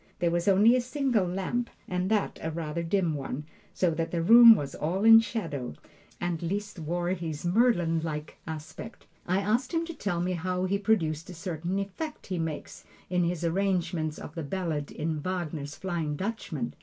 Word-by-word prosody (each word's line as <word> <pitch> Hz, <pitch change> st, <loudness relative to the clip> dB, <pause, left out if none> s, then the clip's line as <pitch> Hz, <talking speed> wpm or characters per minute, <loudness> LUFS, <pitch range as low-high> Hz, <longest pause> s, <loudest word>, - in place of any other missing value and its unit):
There 170 Hz, -1 st, +1 dB
was 175 Hz, +1 st, 0 dB
only 205 Hz, +5 st, +6 dB
a 255 Hz, -, +2 dB
single 250 Hz, -6 st, 0 dB
lamp, 195 Hz, +7 st, -2 dB, 0.2 s
and 180 Hz, +1 st, -1 dB
that 215 Hz, -2 st, 0 dB
a 160 Hz, -, -2 dB
rather 160 Hz, 0 st, -3 dB
dim 170 Hz, -1 st, +1 dB
one, 140 Hz, 0 st, -4 dB, 0.3 s
so 180 Hz, -2 st, +1 dB
that 165 Hz, +1 st, -2 dB
the 170 Hz, -1 st, -1 dB
room 230 Hz, +4 st, +10 dB
was 145 Hz, -6 st, -4 dB
all 185 Hz, +7 st, -1 dB
in 225 Hz, 0 st, +10 dB
shadow, 165 Hz, -, -3 dB, 0.4 s
and 175 Hz, -2 st, -2 dB
Liszt 205 Hz, +3 st, -3 dB
wore 175 Hz, +2 st, -2 dB
his 170 Hz, -4 st, -3 dB
Merlin 175 Hz, -5 st, +3 dB
like 155 Hz, -1 st, -5 dB
aspect. 160 Hz, +8 st, -8 dB, 0.2 s
I 185 Hz, +2 st, +2 dB
asked 235 Hz, -, 0 dB
him 330 Hz, 0 st, +1 dB
to 335 Hz, -, -6 dB
tell 200 Hz, -, -2 dB
me 180 Hz, +1 st, 0 dB
how 180 Hz, +1 st, -1 dB
he 200 Hz, +2 st, 0 dB
produced 165 Hz, -7 st, 0 dB
a 180 Hz, -, -8 dB
certain 170 Hz, +2 st, -3 dB
effect 200 Hz, +11 st, -5 dB
he 185 Hz, -2 st, -3 dB
makes 160 Hz, -2 st, -5 dB, 0.3 s
in 180 Hz, -1 st, +2 dB
his 175 Hz, -1 st, -2 dB
arrangement 170 Hz, -3 st, 0 dB
of 145 Hz, -, -9 dB
the 165 Hz, -, -4 dB
ballad 155 Hz, -2 st, -3 dB
in 155 Hz, 0 st, -2 dB
Wagner's 160 Hz, -5 st, -4 dB
"Flying 170 Hz, -5 st, -2 dB
Dutchman." 170 Hz, -, -4 dB
175 Hz, 180 wpm, -28 LUFS, 160-200 Hz, 0.4 s, room